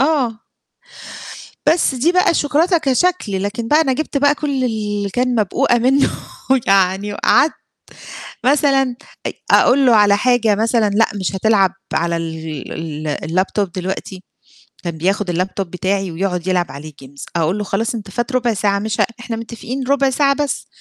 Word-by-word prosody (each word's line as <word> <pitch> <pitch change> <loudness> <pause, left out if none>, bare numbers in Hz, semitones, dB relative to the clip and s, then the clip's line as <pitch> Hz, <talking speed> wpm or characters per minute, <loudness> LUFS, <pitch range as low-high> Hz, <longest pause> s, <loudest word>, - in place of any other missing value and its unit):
آه. 270 -6 +1 1.3
بس 310 -4 +3
دي 295 +8 +2
بقى 365 0 +3
الشوكولاتة 330 +4 +2
كشكل 270 - 0
لكن 220 +3 -3
بقى 305 +4 +4
أنا 265 -4 +1
جِبت 300 0 -2
بقى 285 +1 +3
كل 280 -4 -2
اللي 205 -3 -2
كان 250 +4 0
مبقوقة 215 +4 +2
منه 265 +4 +3 0.6
يعني 195 +1 +2
وقعدت 305 - +3 0.9
مثلًا 270 -2 +2 0.3
أ - - -2 0.2
أقول 270 +2 +5
له 235 -3 +5
على 205 -1 +5
حاجة 235 -3 +2
مثلًا 225 0 +1
لأ 215 +3 +3
مش 190 -1 -2
هتلعب 195 -2 +2 0.2
على 170 0 0
ال 160 -1 -6
ال 145 - -1
الlaptop 190 +2 0
دلوقتي، 185 0 -5 0.6
كان 170 -2 -4
بياخد 190 +3 0
اللابتوب 185 +1 -2
بتاعي 190 0 -1
ويقعد 180 +1 -2
يلعب 180 -2 0
عليه 150 +2 -9
games، 140 +1 -11
أقول 170 +4 +1
له 210 - -2
خلاص 220 +4 -2
أنت 205 -3 -7
فات 240 +6 -3
ربع 245 -2 +1
ساعة 200 -1 0
مش 215 0 -1
ه - - +6 0.2
إحنا 240 -2 -5
متفقين 235 +3 -6
ربع 275 -1 +2
ساعة 275 +1 +2
بس، 290 -1 -3
215 Hz, 160 wpm, -18 LUFS, 190-260 Hz, 1.3 s, ه